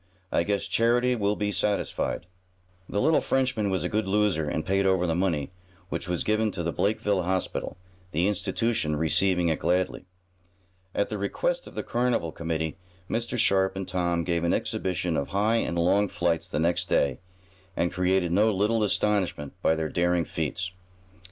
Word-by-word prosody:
I - - +2
guess 100 +3 0
charity 120 +2 +2
will 105 -2 +1
be 105 0 -1
satisfied." 100 -4 -1 0.6
The 100 - -1
little 155 +8 +3
Frenchman 125 -6 0
was 95 -1 0
a - - 0
good 105 -1 -1
loser, 95 -6 +1
and 80 - -2
paid 95 0 +2
over 95 -2 +2
the 85 - +1
money, 85 -4 0 0.4
which 95 - -4
was 90 -2 0
given 110 +1 +1
to 85 - -3
the 85 - -1
Blakeville 105 -2 +1
Hospital, 95 0 -2 0.3
the 85 +4 +1
institution 105 -4 0
receiving 85 +3 +2
it 80 - 0
gladly. 90 0 0 0.9
At 100 - +1
the 105 - -4
request - - -1
of - - -12
the - - -3
carnival 120 -9 0
committee, 80 0 -3 0.3
Mr. 120 +1 -2
Sharp 95 -3 +3
and 95 -1 -4
Tom 85 -2 0
gave 85 -1 0
an 85 - +2
exhibition 90 -2 -1
of 70 - -1
high 105 +4 +1
and 85 -6 -1
long 95 +4 +3
flights 85 -2 -1
the 90 - -3
next 85 +2 +1
day, 70 -3 +2 0.6
and 85 - 0
created 90 -1 +1
no 105 +5 +4
little 105 +3 +1
astonishment 100 -8 0
by 80 - +3
their 80 -1 -1
daring 85 -1 +1
feats. 80 +4 -3
95 Hz, 170 wpm, -27 LUFS, 85-105 Hz, 0.9 s, no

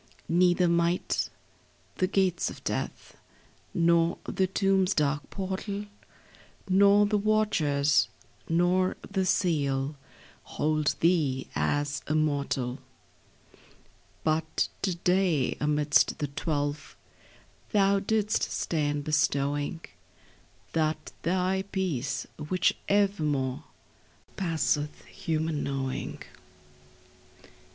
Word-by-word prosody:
Neither 175 +1 +4
might 170 +1 +1 0.7
the 185 - +2
gates 185 -3 +1
of - - -11
death, - - -4 0.6
Nor 170 -1 +3
the 190 - 0
tomb's 195 0 +2
dark 145 -1 0
portal, 200 +1 -4 0.8
Nor 200 +2 +5
the 205 0 +1
watchers, 165 -10 +2 0.4
nor 180 +2 +2
the 190 -2 -1
seal, 145 -6 +1 0.6
Hold 155 -1 +1
thee 155 -7 +2
as 145 0 0
a 155 - 0
mortal; 140 -4 0 1.4
But 160 0 0
to 190 -3 0
day 180 -5 +1
amidst 150 0 +2
the 145 - -3
twelve 145 0 -3 0.8
Thou 200 -2 +4
didst 215 +1 0
stand 145 -3 -1
bestowing 145 +1 0 0.9
That 155 -1 -1
thy 185 +2 +1
peace, 140 -10 -2 0.2
which 185 -1 +2
evermore 155 -11 +1 0.7
Passeth 160 -4 -1
human 160 -2 -2
knowing. 135 -1 -3
165 Hz, 85 wpm, -28 LUFS, 145-190 Hz, 1.4 s, Nor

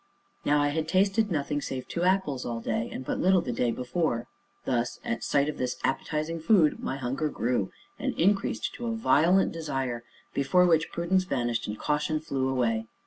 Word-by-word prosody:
Now 145 0 +3
I 145 0 +2
had 155 +1 -1
tasted 195 +4 +2
nothing 145 -2 -1
save 130 -2 -5
two 170 - -3
apples 180 -8 +1
all 115 -1 -3
day, 115 0 -2
and 130 - -6
but - - -2
little 185 0 +4
the 170 - -3
day 120 +1 +1
before 125 0 -1 0.4
thus, 120 -2 -1
at 235 -1 -2
sight 140 0 +2
of 150 - -4
this 125 -1 -1
appetizing 155 +4 -1
food, 165 -2 +4
my 135 - -3
hunger 135 +4 -1
grew, 125 -3 -1 0.3
and 260 -1 -2
increased 195 +3 +1
to 240 - -5
a 230 - -1
violent 190 -3 +4
desire 135 -7 -3 0.3
before 180 +6 +3
which 165 -2 +3
prudence 185 +2 +1
vanished 120 -8 -1
and 105 0 -4
caution 150 +3 0
flew 135 -4 -1
away. 115 -4 0
150 Hz, 185 wpm, -28 LUFS, 125-175 Hz, 0.4 s, little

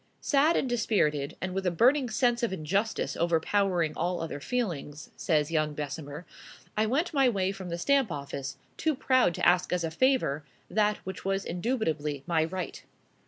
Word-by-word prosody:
"Sad 295 +3 +3
and - - 0
dispirited, 175 - 0
and 185 -1 -3
with 195 0 -2
a - - +5
burning 250 - +3
sense 240 +2 +2
of 235 - 0
injustice 195 +6 -1
overpowering 170 0 +1
all 175 +2 -1
other 165 -3 -4
feelings," 155 - -3
says 155 -2 +1
young 155 -2 0
Bessemer, 145 +2 -5 0.5
"I 215 +1 +2
went 295 +10 0
my 270 -3 +4
way 195 -4 0
from 190 -2 -7
the 170 - -3
Stamp 270 +2 +2
Office, 140 -3 -5 0.2
too 315 -2 +1
proud 255 -9 +3
to - - +2
ask 180 +1 +3
as 180 -1 0
a 165 - -2
favor 205 - +2 0.3
that 210 +2 +2
which 190 0 -6
was 195 0 -1
indubitably 165 - -2
my 165 -2 +2
right." 180 +2 -5
185 Hz, 170 wpm, -29 LUFS, 160-235 Hz, 0.5 s, a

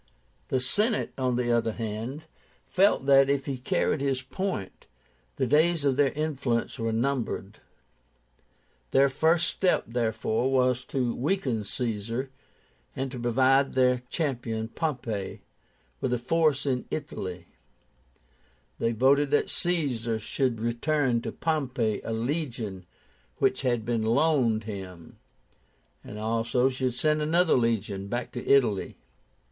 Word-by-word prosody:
The 130 - +1
Senate, 210 - +1
on 130 -2 0
the 120 -1 0
other 115 -1 +1
hand, 115 +7 -5 0.4
felt 190 -7 +3
that, 135 0 +6
if 140 -1 +1
he 135 -3 -3
carried 130 +3 0
his 135 -2 0
point, 145 - -4 0.5
the - - 0
days 155 +3 +3
of 135 -2 +3
their 140 0 +3
influence 140 -5 -2
were 115 0 -1
numbered. 115 -4 -2 1.3
Their 135 +1 +4
first 160 +5 +2
step, 185 -2 +1
therefore, 115 +1 0
was 125 -1 +2
to 125 -3 -1
weaken 130 - -1
Caesar, 115 +4 -3 0.6
and 135 0 -3
to 125 - -6
provide 130 +3 +3
their 125 -1 +3
champion, 120 -8 -2
Pompey, 120 -10 -3 0.6
with 130 - -1
a 125 - +2
force 150 +2 +1
in 130 -3 -1
Italy, 90 - -5 1.3
They 115 0 +1
voted 135 +5 +3
that 145 - +1
Caesar 135 -11 0
should 115 +2 -1
return 120 +2 0
to - - -4
Pompey 130 -9 -1
a - - -4
legion 115 - -3 0.5
which 130 - +1
had 120 -4 0
been 115 -1 0
loaned 115 -1 +2
him, 95 -5 -8 0.8
and 105 - -9
also 115 +4 +1
should 130 -1 -2
send 150 +4 +1
another 165 +3 +3
legion 110 -5 0
back 120 +3 -3
to 125 - -6
Italy. 120 -8 +2
125 Hz, 130 wpm, -27 LUFS, 115-140 Hz, 1.3 s, that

